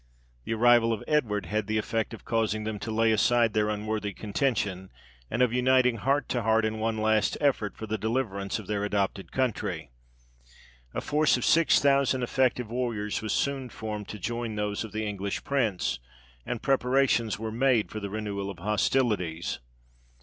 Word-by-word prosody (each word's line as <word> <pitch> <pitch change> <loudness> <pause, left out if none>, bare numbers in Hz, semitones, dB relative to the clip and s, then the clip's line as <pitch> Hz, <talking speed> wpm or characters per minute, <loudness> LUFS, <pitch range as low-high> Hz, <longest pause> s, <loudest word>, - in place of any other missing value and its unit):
The 115 - -1
arrival 120 0 +5
of 110 - -4
Edward 115 -10 +1
had 105 -1 -2
the 110 0 0
effect 110 +1 -1
of 115 - -10
causing 110 -2 0
them 105 -1 -4
to 115 - -5
lay 110 +1 +2
aside 115 +1 +3
their 105 0 +2
unworthy 105 -1 -2
contention, 100 -4 -1 0.4
and 120 +3 +2
of 120 -2 +2
uniting 125 -1 +3
heart 140 +6 +1
to 120 - 0
heart 110 0 +3
in 110 0 -2
one 110 0 -1
last 110 -1 +2
effort 130 -8 0
for 110 - -5
the 110 0 -3
deliverance 110 -4 -1
of 110 - -8
their 105 +1 -2
adopted 100 -1 -1
country. 130 - -2 1.0
A - - -1
force 150 -2 +2
of 125 - -2
six 165 -2 +5
thousand 140 -2 +3
effective 125 -2 +1
warriors 115 -4 -2
was 110 - -3
soon 135 -2 -1
formed 105 -2 -6
to 105 - -6
join 115 +3 -3
those 105 0 -2
of 110 - -8
the 110 +1 -3
English 100 -1 -3
prince, 110 - 0 0.5
and 120 - -3
preparations 130 -4 +2
were 110 +1 -4
made 120 -1 +2
for 110 - -4
the 100 -1 -5
renewal 100 -1 -3
of 100 - -7
hostilities. 105 -3 0
110 Hz, 175 wpm, -28 LUFS, 105-125 Hz, 1.0 s, arrival